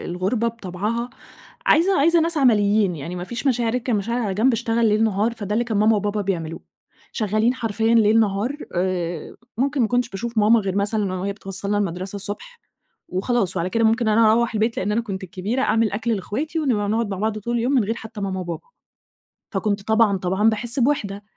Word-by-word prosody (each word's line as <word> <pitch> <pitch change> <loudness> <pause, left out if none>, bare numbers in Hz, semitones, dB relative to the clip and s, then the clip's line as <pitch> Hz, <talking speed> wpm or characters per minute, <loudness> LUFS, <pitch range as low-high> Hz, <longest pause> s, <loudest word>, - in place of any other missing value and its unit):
الغُربة 195 +7 -1
بطَبعها 225 +3 -4 0.6
عايزة 355 +4 +4
عايزة 335 +3 +4
ناس 330 0 0
عمليين 210 - +3
يعني 165 +5 -6
ما 180 - -4
فيش 240 +8 -5
مشاعر، 240 -3 +2
أركن 250 0 -1
المشاعر 230 +4 -1
على 200 -3 -2
جنب 235 +6 +3
اشتغل 230 0 +1
ليل 215 +1 +3
نهار، 215 +2 +1
فَده 205 -3 -5
اللي 240 +2 +1
كان 225 -3 -2
ماما 215 +1 +4
وبابا 205 +1 -1
بيعملوه، 170 -5 -3 0.5
شغالين 215 +3 +1
حرفيًا 225 -1 0
ليل 225 0 +5
نهار 210 +6 0 0.2
آآ 175 -2 -2 0.2
ممكن 275 +3 0
ما 220 - +2
كُنتَش 245 0 +1
باشوف 235 +2 -4
ماما 220 +2 +5
غير 195 -2 -3
مثلًا 200 -1 0
وهي 195 +2 -2
بتوصلنا 200 +1 -2
المدرسة 190 0 -3
الصبح 340 - -7 0.5
وخلاص 195 +1 -1
وعلى 180 +1 -1
كده 230 +3 +1
ممكن 225 +1 +2
أنا 215 0 +5
أروح 235 0 +1
البيت 220 +2 0
لأن 200 +3 -1
أنا 230 - +1
كُنت 195 -5 -5
الكبيرة 195 +8 -3
أعمل 225 -4 +2
أكل 225 +3 -1
لأخواتي 290 - -3
ونبقى 220 -9 0
نقعُد 225 +1 0
مع 195 - -3
بعض 215 +1 -1
طول 235 +3 -2
اليوم 240 +4 0
من 250 -7 +3
غير 225 - -1
حتى 220 -2 -9
ماما 190 -1 -2
وبابا. 170 -3 -5 0.9
فَكُنت 205 -2 -1
طبعًا، 220 -2 +3
طبعًا 190 +4 +2
باحسّ 235 +4 -1
بوَحدة. 210 -7 0
215 Hz, 195 wpm, -22 LUFS, 195-235 Hz, 0.9 s, ليل